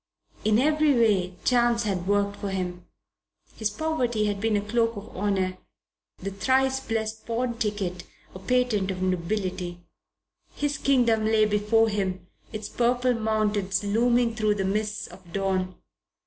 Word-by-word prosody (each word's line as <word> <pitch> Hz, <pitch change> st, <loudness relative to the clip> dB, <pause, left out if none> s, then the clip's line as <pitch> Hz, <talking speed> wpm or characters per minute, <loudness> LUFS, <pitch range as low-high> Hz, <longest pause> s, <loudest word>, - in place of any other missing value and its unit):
In 215 Hz, 0 st, +3 dB
every 305 Hz, +2 st, +3 dB
way 200 Hz, -6 st, +2 dB
Chance 240 Hz, -1 st, +3 dB
had 190 Hz, -4 st, -2 dB
worked 200 Hz, 0 st, +1 dB
for 200 Hz, -, -4 dB
him. 180 Hz, -2 st, -4 dB, 0.7 s
His 220 Hz, -1 st, -1 dB
poverty 245 Hz, -4 st, -1 dB
had 205 Hz, -1 st, -1 dB
been 220 Hz, -1 st, +2 dB
a -, -, 0 dB
cloak 230 Hz, 0 st, +1 dB
of 205 Hz, +2 st, -9 dB
honour; 190 Hz, -2 st, 0 dB, 0.6 s
the 195 Hz, +2 st, -5 dB
thrice 265 Hz, +6 st, +2 dB
blessed 220 Hz, -3 st, -3 dB
pawn 235 Hz, 0 st, -2 dB
ticket 195 Hz, -5 st, -2 dB, 0.3 s
a 185 Hz, -, -8 dB
patent 225 Hz, -2 st, +1 dB
of 185 Hz, -1 st, -3 dB
nobility. 185 Hz, -1 st, -2 dB, 0.8 s
His 290 Hz, -1 st, -1 dB
kingdom 240 Hz, -5 st, +3 dB
lay 215 Hz, 0 st, +4 dB
before 210 Hz, +2 st, +3 dB
him, 190 Hz, -4 st, -2 dB, 0.3 s
its 215 Hz, -2 st, -5 dB
purple 245 Hz, +1 st, +1 dB
mountains 215 Hz, -3 st, 0 dB
looming 235 Hz, +3 st, +2 dB
through 215 Hz, -2 st, +1 dB
the 195 Hz, -2 st, -1 dB
mists 210 Hz, +2 st, -1 dB
of 175 Hz, -, -14 dB
dawn. 185 Hz, -1 st, -1 dB
215 Hz, 145 wpm, -26 LUFS, 195-235 Hz, 0.8 s, lay